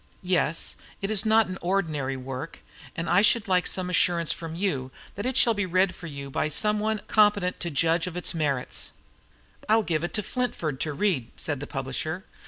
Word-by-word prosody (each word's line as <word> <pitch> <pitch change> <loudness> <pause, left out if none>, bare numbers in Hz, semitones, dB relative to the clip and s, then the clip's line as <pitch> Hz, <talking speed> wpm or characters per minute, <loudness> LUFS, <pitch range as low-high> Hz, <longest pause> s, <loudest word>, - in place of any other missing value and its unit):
Yes, 165 -3 +2 0.2
it 195 +2 -2
is 215 0 +1
not 220 0 +5
ordinary 155 -8 -1
work, 130 +4 -6 0.4
and 165 0 -3
I 180 +4 +5
should 215 0 +3
like 180 -1 +3
some 185 -1 +1
assurance 170 -2 +2
from 165 -1 -5
you 150 -9 -1 0.2
that 205 +5 -4
it 260 0 -1
shall 235 - +5
be 205 -3 -1
read 185 +1 +2
for 170 - -9
you 140 -2 -7
by 155 - 0
some 210 +7 +1
one 215 0 -1
competent 205 -4 +3
to 170 - -3
judge 165 +3 +1
of 180 -1 -5
its 180 - +1
merits." 145 -6 -1 0.8
"I'll 220 +1 +5
give 165 -4 -1
it 175 - -3
to 210 - 0
Flintford 175 - -2
to 150 0 -1
read," 145 - 0
said 145 -6 -3
the 145 - -6
publisher. 135 - -4
175 Hz, 190 wpm, -26 LUFS, 150-205 Hz, 0.8 s, not